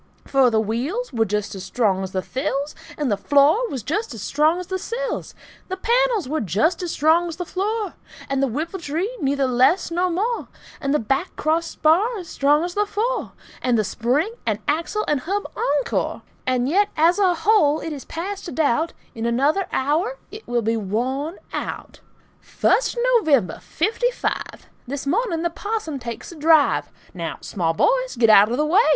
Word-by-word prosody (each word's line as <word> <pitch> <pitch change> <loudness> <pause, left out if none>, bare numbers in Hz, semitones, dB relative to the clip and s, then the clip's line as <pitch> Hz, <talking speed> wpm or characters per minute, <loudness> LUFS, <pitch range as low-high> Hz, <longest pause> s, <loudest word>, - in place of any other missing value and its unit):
For 270 -2 +4
the 220 -2 +2
wheels 260 - -2
were 225 -2 +2
just 210 0 -2
as 190 -2 -7
strong 195 -1 +1
as 190 -1 -4
the 185 -1 -2
thills, 280 +2 -2 0.2
And 290 -6 0
the 205 - +1
floor 295 - +3
was 260 -6 -4
just 335 - -2
as 210 - -7
strong 305 +8 +2
as 365 - -5
the 375 +1 -3
sills, - - -4 0.3
And - - -3
the - - -3
panels 470 - +2 0.2
just 220 - +1
as 355 - -3
strong 320 +3 +3
as 330 - -5
the 355 +2 -4
floor, 410 +2 -2 0.3
And 275 0 0
the 275 - +3
whipple 315 - -3
tree 340 +9 -2
neither 275 0 +1
less 260 +9 +3
nor 355 +2 +1
more, 430 +8 -1 0.3
And 275 -2 -1
the 300 - +4
back 270 - -1
crossbar 335 +7 +1
as 360 -4 -7
strong 290 +3 +2
as 350 0 -3
the 415 +1 +1
fore, 460 +5 -2 0.3
And 245 -2 +2
the 215 - +2
spring 255 - 0
and - - 0
axle 330 +8 0
and 295 - +1
hub 395 +9 -2
encore. 285 -1 -1 0.2
And 255 -1 +1
yet, 400 +7 +3
as 335 +5 +4
a 370 -3 +4
whole, 325 -4 +3
it 320 - -5
is 280 - -7
past 380 +4 -5
a - - -5
doubt 315 +1 +1 0.2
In 225 0 -3
another 285 +11 +1
hour 325 - 0
it 430 +2 -10
will 240 -1 0
be 225 +2 +1
worn 255 - -2 0.2
out! - - -5 0.4
First - - +1
of 475 - 0
November, 275 - +2
'Fifty 425 - 0
five! - - -4 0.2
This 275 +2 -4
morning 340 - 0
the 345 - 0
parson 405 -7 -3
takes 235 +2 -7
a - - -10
drive. 315 -1 +3 0.2
Now, 170 -3 -4
small 165 -4 -1
boys, - - +2
get 225 -2 +5
out 210 0 +7
of 240 - -1
the 300 - +2
way! 360 +8 +5
310 Hz, 190 wpm, -22 LUFS, 255-380 Hz, 0.4 s, out